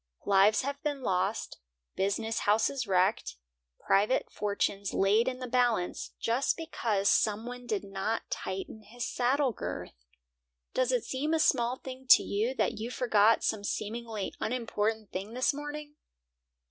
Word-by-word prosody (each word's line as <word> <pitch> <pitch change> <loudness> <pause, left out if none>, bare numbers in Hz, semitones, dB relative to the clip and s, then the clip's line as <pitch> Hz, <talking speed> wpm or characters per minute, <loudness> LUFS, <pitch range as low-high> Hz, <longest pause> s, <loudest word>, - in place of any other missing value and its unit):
Lives 205 +3 +4
have 280 +1 -4
been 290 -3 -3
lost, 190 +1 -1 0.4
business 220 +4 -1
houses 225 +4 +1
wrecked, 185 - +1 0.4
private 205 +6 +2
fortunes 200 -1 -1
laid 210 +5 +3
in 255 -1 -1
the 255 - -5
balance, 240 -7 0
just 240 +4 +1
because 225 -11 -1
some 215 +1 +2
one 245 0 -8
did 210 -4 -1
not 195 +3 -3
tighten 190 +3 -5
his 235 +3 -6
saddle 260 +2 +1
girth! 60 - -7 0.7
Does 255 0 +1
it 250 -3 +1
seem 300 +5 -1
a - - +1
small 245 -5 +2
thing 260 0 -10
to - - +9
you 220 +6 -1
that 230 -4 0
you 225 +2 -4
forgot 225 -3 +3
some 215 -2 0
seemingly 220 0 -4
unimportant 220 -3 -2
thing 200 +5 -5
this 255 +3 +2
morning? 295 +1 -6
225 Hz, 145 wpm, -30 LUFS, 205-255 Hz, 0.7 s, to